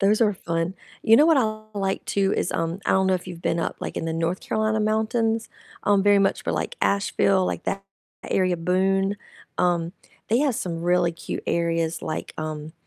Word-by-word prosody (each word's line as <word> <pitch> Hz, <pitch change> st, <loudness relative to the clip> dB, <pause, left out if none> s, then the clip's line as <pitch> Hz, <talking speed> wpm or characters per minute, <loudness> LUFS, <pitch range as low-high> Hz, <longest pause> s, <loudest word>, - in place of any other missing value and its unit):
Those 210 Hz, +2 st, +3 dB
are 215 Hz, -3 st, +4 dB
fun, 170 Hz, 0 st, -2 dB, 0.3 s
you 225 Hz, -, +6 dB
know 300 Hz, -, +6 dB
what 325 Hz, -2 st, +5 dB
I 215 Hz, -3 st, -1 dB
like 195 Hz, 0 st, -1 dB
too 195 Hz, 0 st, +1 dB
is, -, -, -1 dB
um 165 Hz, +2 st, -1 dB
I -, -, +2 dB
don't 190 Hz, 0 st, +3 dB
know 190 Hz, -, +3 dB
if 180 Hz, -, -4 dB
you've 175 Hz, -2 st, -8 dB
been 165 Hz, -, 0 dB
up, 165 Hz, -, -2 dB
like, -, -, -5 dB
in -, -, -2 dB
the 165 Hz, -, -2 dB
North 165 Hz, +3 st, -1 dB
Carolina 220 Hz, 0 st, 0 dB
mountains, 220 Hz, +1 st, 0 dB, 0.3 s
um, 200 Hz, -1 st, +3 dB
very 205 Hz, 0 st, +6 dB
much 195 Hz, -, +1 dB
for, -, -, -1 dB
like, -, -, -3 dB
Asheville, 200 Hz, -1 st, +2 dB
like, -, -, -3 dB
that 195 Hz, 0 st, -2 dB, 0.5 s
area, 185 Hz, -2 st, +2 dB
Boone, 195 Hz, +3 st, +1 dB, 0.4 s
um, 175 Hz, -1 st, +1 dB, 0.4 s
they 230 Hz, -, +3 dB
have 280 Hz, -2 st, +2 dB
some 170 Hz, -5 st, -3 dB
really 175 Hz, 0 st, +3 dB
cute 165 Hz, -, -6 dB
areas, 165 Hz, -1 st, 0 dB
like, 155 Hz, -, -4 dB
um, 155 Hz, 0 st, -5 dB
190 Hz, 200 wpm, -24 LUFS, 170-215 Hz, 0.5 s, you